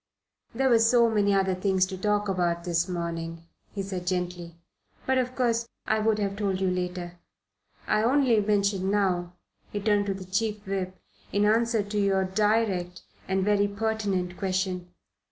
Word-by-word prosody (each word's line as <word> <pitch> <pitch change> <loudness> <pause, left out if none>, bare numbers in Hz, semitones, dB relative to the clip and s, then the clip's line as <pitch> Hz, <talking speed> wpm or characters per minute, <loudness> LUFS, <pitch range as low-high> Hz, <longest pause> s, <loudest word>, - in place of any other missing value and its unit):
"There 265 +2 +2
were 235 -2 +5
so 230 0 +4
many 205 -2 +2
other 190 -1 +2
things 190 0 +2
to 190 - -6
talk 205 +2 0
about 175 -3 0
this 170 0 0
morning," 165 -1 -4 0.3
he 200 - -4
said 185 -2 -5
gently; 180 -2 -3 0.5
"but 265 0 +2
of 255 0 -2
course 235 -2 +1 0.2
I 220 - +1
would 215 0 +2
have 200 -1 -1
told 195 -3 -1
you 190 -1 +1
later. 180 -1 -4 0.7
I 215 - +2
only 245 -1 +3
mention 200 -2 +1
it - - +1
now" 180 -4 0 0.4
he 205 - -2
turned 205 0 +1
to 195 - -1
the 190 -1 -8
Chief 210 +2 -2
Whip 190 -1 -3 0.3
"in 205 +1 +2
answer 225 0 +2
to 205 +1 -3
your 195 -1 +2
direct 190 -3 0 0.2
and 190 0 0
very 205 -1 +3
pertinent 200 -4 -2
question." 185 -2 -2
195 Hz, 170 wpm, -27 LUFS, 180-215 Hz, 0.7 s, were